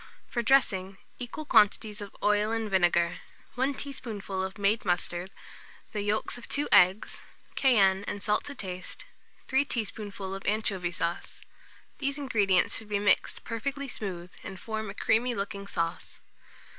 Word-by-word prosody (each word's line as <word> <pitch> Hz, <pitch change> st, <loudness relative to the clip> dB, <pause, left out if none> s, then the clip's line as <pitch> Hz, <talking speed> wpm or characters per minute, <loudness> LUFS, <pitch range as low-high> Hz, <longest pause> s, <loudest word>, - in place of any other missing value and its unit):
For 240 Hz, -, -1 dB
dressing, 195 Hz, -7 st, +3 dB, 0.2 s
equal 250 Hz, +5 st, -4 dB
quantities 210 Hz, -3 st, +3 dB
of 205 Hz, -, -8 dB
oil 210 Hz, +1 st, +3 dB
and 225 Hz, -2 st, -1 dB
vinegar, 175 Hz, -2 st, +3 dB, 0.3 s
1 265 Hz, +3 st, 0 dB
teaspoonful 215 Hz, -9 st, -4 dB
of 190 Hz, +2 st, -5 dB
made 205 Hz, +2 st, +2 dB
mustard, 175 Hz, 0 st, -1 dB, 0.6 s
the 210 Hz, -, -2 dB
yolks 210 Hz, +4 st, -1 dB
of 235 Hz, -, -12 dB
2 290 Hz, +1 st, +2 dB
eggs; 185 Hz, +4 st, +5 dB, 0.3 s
cayenne 200 Hz, -7 st, +4 dB
and 205 Hz, -, -4 dB
salt 210 Hz, 0 st, +2 dB
to 285 Hz, -, -6 dB
taste; 185 Hz, -4 st, -6 dB, 0.4 s
3 265 Hz, +1 st, +3 dB
teaspoonful 205 Hz, -6 st, -4 dB
of 195 Hz, -, -5 dB
anchovy 200 Hz, -4 st, +1 dB
sauce. 170 Hz, 0 st, -3 dB, 0.6 s
These 280 Hz, 0 st, 0 dB
ingredients 210 Hz, -10 st, +2 dB
should 220 Hz, -2 st, -5 dB
be 205 Hz, -, +1 dB
mixed 205 Hz, -1 st, +2 dB
perfectly 275 Hz, +5 st, -3 dB
smooth, 180 Hz, -7 st, -5 dB
and 190 Hz, -, -7 dB
form 220 Hz, -1 st, -4 dB
a 200 Hz, -, -7 dB
creamy 240 Hz, +4 st, +2 dB
looking 200 Hz, -1 st, -4 dB
sauce. 170 Hz, -3 st, -3 dB
205 Hz, 145 wpm, -29 LUFS, 190-230 Hz, 0.6 s, eggs